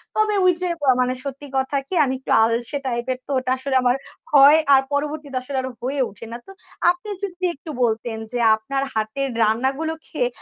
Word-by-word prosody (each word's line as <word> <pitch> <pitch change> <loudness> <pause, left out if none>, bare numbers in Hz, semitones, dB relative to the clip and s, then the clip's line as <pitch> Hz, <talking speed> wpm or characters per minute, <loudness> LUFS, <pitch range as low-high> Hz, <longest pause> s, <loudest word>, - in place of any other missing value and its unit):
তবে 430 -1 +2
ওইযে 360 0 +2
ব - - -8 0.2
মানে 250 0 +1
সত্যি 280 +1 -7
কথা 265 +2 0
কি - - -7
আমি 260 - -1
একটু 265 - -6
আলসে 230 +4 0
টাইপের 250 0 -2
তো - - -5
ওটা 255 0 -3
আসলে 265 +1 -3
আমার 245 0 +3 0.4
হয় 290 +2 +8
আর 265 - +7
পরবর্তীতে 290 -1 -2
আসলে 265 +2 -5
আরো 260 - -4
হয়ে 270 +3 -2
ওঠে 210 +3 -11
না 235 - -5
তো। - - -10 0.4
আপনি 355 +4 -8
যদি 370 -2 -5
একটু 290 +3 -12
বলতেন 225 0 -1 0.2
যে 245 - -1 0.2
আপনার 270 +5 -3
হাতের 220 +6 -2
রান্নাগুলো 265 +9 0
খেয়ে 250 -5 -1
270 Hz, 190 wpm, -22 LUFS, 245-290 Hz, 0.4 s, হয়